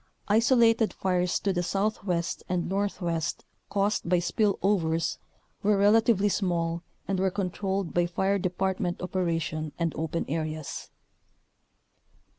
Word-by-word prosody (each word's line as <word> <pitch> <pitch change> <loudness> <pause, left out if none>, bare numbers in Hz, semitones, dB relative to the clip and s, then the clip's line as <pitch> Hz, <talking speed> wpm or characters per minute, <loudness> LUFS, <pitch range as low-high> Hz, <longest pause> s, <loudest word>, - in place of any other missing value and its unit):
Isolated 230 0 +4
fires 180 -1 0
to 195 - +1
the 175 - 0
southwest 185 -2 -1
and 180 -1 0
northwest 175 -4 -2 0.2
caused 200 -3 0
by 180 - +4
spill 200 +3 +1
overs 165 -5 +1 0.4
were 205 0 +3
relatively 205 0 +4
small 170 -4 0 0.3
and 195 -1 0
were 190 0 +2
controlled 190 -1 -2
by 175 0 +2
fire 190 +3 +1
department 185 -1 -1
operation 165 -4 -2
and 170 -2 0
open 160 +1 -2
areas. 155 -1 -4
185 Hz, 115 wpm, -28 LUFS, 170-200 Hz, 0.4 s, Isolated